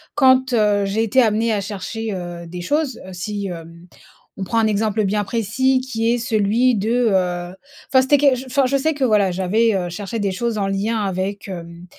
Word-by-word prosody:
quand, 260 -2 +4
heu, 205 -3 +2
j'ai 205 +3 -1
été 225 +4 +2
amenée 220 +1 +1
à 205 - 0
chercher, 215 +2 -5
heu, 175 -2 -6
des 175 +1 -7
choses, 290 - -1
heu, 190 - -10
si, 200 +2 -4
hem, 170 0 -9 0.5
on 195 - -4
prend 230 +3 0
un 220 - +3
exemple 215 0 0
bien 205 +1 0
précis 250 +5 +1
qui 230 -2 -1
est - - +1
celui 230 +2 +2
de, 230 +4 +1
heu, 180 -1 -1 0.3
enfin 260 -1 +5
c'était 285 +2 +4
quel 280 -3 +4
je 260 +2 -7
enfin 265 +1 +1
je 275 +1 +1
sais 315 +3 0
que 280 -2 -3
voilà 210 -6 +3
j'avais, 205 +5 +1
heu, 175 -2 -2
cherché 205 +5 -5
des 200 -2 0
choses 230 +2 -2
en 195 - 0
lien 210 +3 -1
avec, 195 +1 -3
hem, 170 -1 -8
215 Hz, 210 wpm, -20 LUFS, 190-240 Hz, 0.5 s, enfin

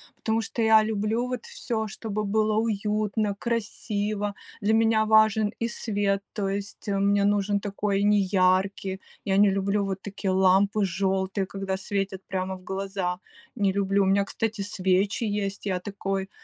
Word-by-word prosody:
потому 225 0 0
что 225 +1 -3
я 220 -1 +6
люблю 220 +3 -1
вот 250 -2 -4
всё, 220 -2 -3
чтобы 215 0 -4
было 215 +1 +1
уютно, 210 -1 0
красиво. 210 -2 -2 0.3
Для 210 +2 +2
меня 225 -1 +3
важен 220 -1 +4
и 230 - +1
свет, 205 -4 -1
то 200 -2 -2
есть 200 +1 -5
мне 200 0 +2
нужен 205 0 +2
такой 200 0 -1
неяркий, 190 -1 +2 0.2
я 195 -1 +1
не 205 0 +6
люблю 195 +1 0
вот 195 -1 -3
такие 200 -1 -3
лампы 190 +2 +3
желтые, 190 +1 -1
когда 195 -1 -3
светят 195 0 -3
прямо 190 0 -2
в 185 - -18
глаза,- 190 -2 -3 0.4
не 200 -2 +1
люблю. 200 0 +2
У - - +1
меня, 195 +1 +3
кстати, 220 +1 -3
свечи 195 +2 0
есть, 205 -1 -2
я 185 -3 0
такой, 195 0 -3
200 Hz, 155 wpm, -26 LUFS, 195-215 Hz, 0.4 s, я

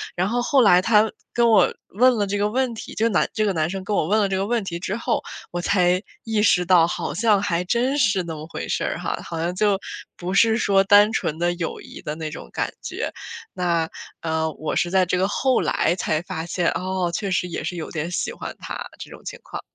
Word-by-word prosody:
然 180 +2 +1
后 245 +3 0
后 270 +1 +3
来 180 -5 +6
他 215 +1 +4 0.2
跟 235 0 +3
我 215 - +5 0.2
问 245 +3 +4
了 205 - +1
这 205 +1 -1
个 205 +1 +1
问 255 +1 0
题， - - -8
这 225 - +2
男 - - +1
这 215 -1 +1
个 200 - +1
男 155 -1 0
生 190 +1 -4
跟 205 0 -1
我 155 - +1
问 215 +4 +3
了 205 - +2
这 190 - -1
个 195 +1 0
问 235 0 +1
题 170 -2 -4
之 190 +3 -3
后， 235 0 -1 0.3
我 175 0 -3
才 180 -1 +2 0.2
意 220 -2 0
识 180 -4 +4
到， 170 -2 +5
好 170 - -3
像 210 +2 +3
还 180 -3 0
真 245 +8 +1
是 200 -6 +2
那 165 -2 -5
么 155 +1 -8
回 165 - -6
事 - - -1
儿 - - -2
哈， - - -3
好 165 - -6
像 170 +2 -1
就 200 0 +2 0.4
不 180 +1 -4
是 225 +2 +4
说 195 -4 +3
单 205 +2 +6
纯 155 -7 -1
的 175 +1 +1
友 170 -2 -4
谊 - - -11
的 150 0 -4
那 155 -1 -5
种 - - -9
感 - - -2
觉。 - - -4 0.4
那， 170 -3 0 0.3
呃， 160 0 0
我 155 - -4
是 175 - +1
在 185 0 +3
这 180 +1 0
个 190 +2 +2
后 260 +5 +1
来 170 - +1
才 155 -3 0
发 160 -2 -5
现， 175 0 0
哦！ 185 -1 -2
确 200 +2 -2
实 180 -1 0
也 175 - -5
是 180 - -3
有 165 -2 -6
点 160 +1 -3
喜 - - -1
欢 - - -7
他， - - -6
这 - - -9
种 - - -12
情 - - -7
况。 - - -7
190 Hz, 265 characters per minute, -23 LUFS, 175-215 Hz, 0.4 s, 来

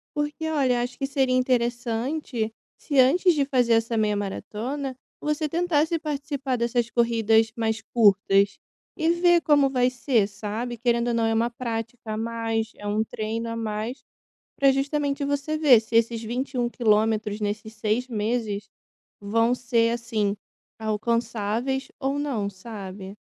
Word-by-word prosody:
Porque, 295 +2 -2
olha, 260 -6 +2
acho 245 +1 -4
que 275 - -2
seria 265 -2 +1
interessante, 240 0 -1 0.2
se 285 -3 0
antes 345 +8 +5
de 285 -2 +1
fazer, 245 -4 +2
essa 225 0 +1
meia-maratona, 220 +6 -2 0.2
você 300 +1 -1
tentasse, 330 -1 +1
participar 285 -3 -3
dessas 235 0 0
corridas 225 -2 +3
mais 220 -1 -1
curtas, 200 -2 +3 0.4
e 320 +1 +1
ver, 345 0 +4
como 290 -3 +4
vai 250 -1 +3
ser, 245 -4 +1
sabe. 220 +4 -5
Querendo 235 0 +1
ou 240 - +1
não, 230 - +2
é 225 - +1
uma 230 +2 +1
prática 230 -1 -5
a - - -3
mais, 225 -1 -2
é 205 - -11
um 210 +1 +1
treino 225 +1 -4
a 230 - -3
mais, 225 +3 -4 0.5
pra 275 -1 +5
justamente, 280 +1 -1
você 285 +2 -1
ver, 270 -7 +7
se 220 +1 -7
esses 230 0 +2
21 245 +2 -2
quilometros 215 -2 +1
nesses 215 +1 -3
6 220 +3 -1
meses, 215 -3 -2 0.5
vão 230 +4 +2
ser, 235 -2 +1
assim, 225 -4 -1 0.4
alcançáveis 230 +3 -1
ou 275 0 -1
não, 245 -9 -1
sabe? 195 -1 -8
235 Hz, 145 wpm, -25 LUFS, 220-270 Hz, 0.5 s, ver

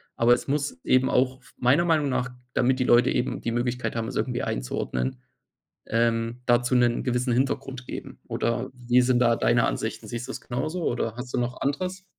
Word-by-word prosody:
aber 120 +1 +5
es - - -1
muss 140 - -1
eben 130 0 +3
auch 130 +1 +1
f - - -20
meiner 135 +8 +3
Meinung 155 -4 +2
nach, 125 -1 -1 0.2
damit 130 +1 +2
die - - +3
Leute 120 +2 +5
eben 125 - -1
die 115 - -2
Möglichkeit 120 +1 -2
haben, 115 -1 -2
es - - -6
irgendwie 125 -2 -1
einzuordnen, 60 +1 -2 0.7
ähm, 115 +1 0
dazu 120 +1 +3
'nen 120 -1 +3
gewissen 125 0 0
Hintergrund 130 0 -1
geben - - -7
oder 120 +2 -1
wie 125 0 +3
sind 125 0 +3
da 120 -1 +4
deine - - +3
Ansichten? - - -3
Siehst 120 +1 -4
du - - -4
das - - -6
genauso 155 +8 -3
oder 115 -2 -2
hast 125 0 -7
du - - +2
noch 125 +1 -2
anderes? 185 +7 -2
125 Hz, 195 wpm, -26 LUFS, 120-130 Hz, 0.7 s, aber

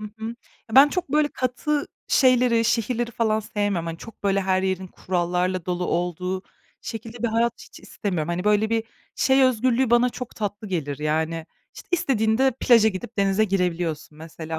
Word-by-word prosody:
Hı 215 - -7
hı. 220 - -7
Ya, 235 - -6 0.4
ben 275 +3 +9
çok 360 +1 -3
böyle 300 +1 +2
katı 285 +4 -2 0.2
şeyleri, 250 -3 +4
şehirleri 235 +1 0
falan 220 -2 0
sevmiyorum. 205 -5 -2
Hani, 165 0 -5
çok 225 - -12
böyle 195 0 +2
her 190 0 +1
yerin 190 0 -1
kurallarla 180 0 -2
dolu 180 0 -1
olduğu 180 +2 -2 0.4
şekilde 225 +1 -7
bir 235 - +2
hayat 230 +2 +1
hiç - - -14
istemiyorum. 175 -6 -3
Hani, 175 +2 -2
böyle 210 +1 +2
bir 225 0 +1 0.3
şey 265 0 +3
özgürlüğü 255 0 +2
bana 240 +1 +5
çok 250 0 -8
tatlı 205 0 -4
gelir, 150 -6 -3
yani. 160 +2 -1 0.3
İşte, - - -12
istediğinde 260 -5 +2
plaja 230 -3 +6
gidip 205 +2 -7
denize 195 +2 +3
girebiliyorsun 175 -6 -2
mesela, 160 0 -7
210 Hz, 170 wpm, -24 LUFS, 180-235 Hz, 0.4 s, ben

